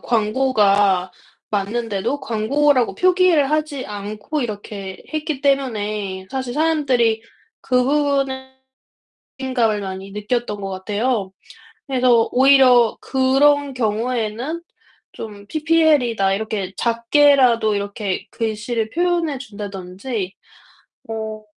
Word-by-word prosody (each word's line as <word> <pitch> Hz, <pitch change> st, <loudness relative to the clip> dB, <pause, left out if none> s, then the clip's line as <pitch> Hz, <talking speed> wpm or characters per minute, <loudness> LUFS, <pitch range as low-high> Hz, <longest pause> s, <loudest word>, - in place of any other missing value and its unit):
광고가 210 Hz, -5 st, +2 dB, 0.4 s
맞는데도 215 Hz, +4 st, -2 dB
광고라고 255 Hz, +4 st, +1 dB
표기를 360 Hz, -6 st, +3 dB
하지 305 Hz, -3 st, -1 dB
않고 210 Hz, +8 st, -5 dB
이렇게 205 Hz, -4 st, -6 dB
했기 310 Hz, -2 st, -3 dB
때문에 210 Hz, -8 st, -1 dB
사실 260 Hz, -2 st, -4 dB
사람들이 265 Hz, -8 st, +1 dB, 0.4 s
그 250 Hz, -1 st, +2 dB
부분은 275 Hz, -2 st, 0 dB, 0.9 s
배신감을 240 Hz, -5 st, 0 dB
많이 190 Hz, 0 st, -6 dB
느꼈던 210 Hz, +1 st, -3 dB
것 195 Hz, -, -4 dB
같아요. 205 Hz, +2 st, -2 dB, 0.6 s
그래서 250 Hz, -4 st, +3 dB
오히려 255 Hz, -3 st, +5 dB
그런 275 Hz, +2 st, +2 dB
경우에는 235 Hz, +5 st, -2 dB, 0.5 s
좀 205 Hz, -2 st, -9 dB
"ppl이다." 295 Hz, -9 st, +2 dB
이렇게 205 Hz, -2 st, -3 dB
작게라도 235 Hz, -1 st, +3 dB
이렇게 200 Hz, -1 st, -3 dB
글씨를 220 Hz, 0 st, -2 dB
표현해 340 Hz, -2 st, 0 dB
준다든지 200 Hz, -2 st, -6 dB, 0.7 s
어 220 Hz, -1 st, -5 dB
235 Hz, 245 characters per minute, -20 LUFS, 210-275 Hz, 0.9 s, 오히려